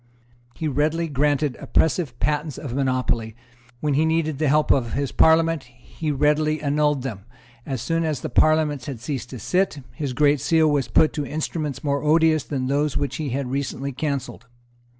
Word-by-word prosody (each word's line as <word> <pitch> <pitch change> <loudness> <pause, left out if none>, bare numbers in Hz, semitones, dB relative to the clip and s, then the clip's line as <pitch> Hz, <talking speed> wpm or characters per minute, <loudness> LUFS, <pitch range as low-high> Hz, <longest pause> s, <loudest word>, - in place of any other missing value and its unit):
He 160 - -3
readily 155 +4 0
granted 145 -1 +1
oppressive 160 -6 0
patents 150 -1 -1
of 135 -6 -6
monopoly. 130 -4 -1 0.5
When 150 -1 0
he 150 +3 +3
needed 160 -2 0
the 155 - +1
help 150 +2 +3
of 120 -4 +1
his 140 -1 -1
Parliament, 160 -1 +3
he 125 +6 -9
as 145 - 0
readily 150 +2 +2
annulled 150 -2 +1
them. 105 -7 -6 0.4
As 130 -5 -3
soon 165 0 0
as 155 -5 -2
the - - -4
Parliament 155 -2 +2
had 135 -5 -6
ceased 130 0 -5
to 130 - -7
sit, 180 +1 0
his 145 -5 -4
Great 145 +2 +3
Seal 160 -2 +3
was 140 -4 +1
put 155 +7 +3
to 150 - -2
instruments 155 -1 -3
more 140 -1 0
odious 155 0 +3
than 135 -3 -3
those 145 +2 0
which 140 -2 -2
he 155 -3 -3
had 130 0 -3
recently 140 0 -3
cancelled. 140 -2 -4
145 Hz, 180 wpm, -23 LUFS, 135-155 Hz, 0.5 s, he